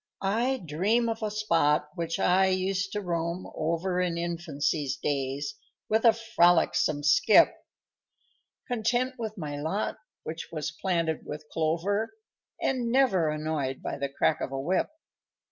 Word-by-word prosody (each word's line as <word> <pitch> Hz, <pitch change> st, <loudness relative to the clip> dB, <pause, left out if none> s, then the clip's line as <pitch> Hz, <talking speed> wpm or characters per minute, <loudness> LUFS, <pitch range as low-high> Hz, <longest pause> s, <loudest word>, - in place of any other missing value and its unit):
_I 230 Hz, +3 st, 0 dB
dream 200 Hz, +10 st, +1 dB
of 225 Hz, 0 st, -3 dB
a 215 Hz, -, -1 dB
spot 155 Hz, -8 st, +2 dB
which 165 Hz, 0 st, -3 dB
I 190 Hz, +1 st, +4 dB
used 190 Hz, +1 st, 0 dB
to 210 Hz, -, -2 dB
roam 170 Hz, 0 st, -2 dB
over 170 Hz, +3 st, -1 dB
In 175 Hz, -2 st, -1 dB
infancy's 160 Hz, -4 st, -1 dB
days, 140 Hz, +1 st, -2 dB, 0.4 s
with 220 Hz, +2 st, +2 dB
a 230 Hz, -, +9 dB
frolicsome 175 Hz, -8 st, +2 dB
skip, 140 Hz, -, +6 dB, 1.1 s
Content 245 Hz, +2 st, 0 dB
with 220 Hz, -2 st, -4 dB
my 145 Hz, -4 st, -5 dB
lot, 165 Hz, +8 st, -2 dB, 0.3 s
which 160 Hz, +1 st, -6 dB
was 155 Hz, -2 st, -3 dB
planted 165 Hz, -2 st, -1 dB
with 150 Hz, 0 st, -6 dB
clover, 180 Hz, -, 0 dB, 0.4 s
And 250 Hz, -3 st, 0 dB
never 235 Hz, -12 st, +3 dB
annoyed 150 Hz, -3 st, -2 dB
by -, -, -4 dB
the 140 Hz, 0 st, -1 dB
crack 140 Hz, +2 st, +1 dB
of -, -, -3 dB
a 135 Hz, -, -3 dB
whip. 175 Hz, +7 st, 0 dB
170 Hz, 140 wpm, -28 LUFS, 155-210 Hz, 1.1 s, a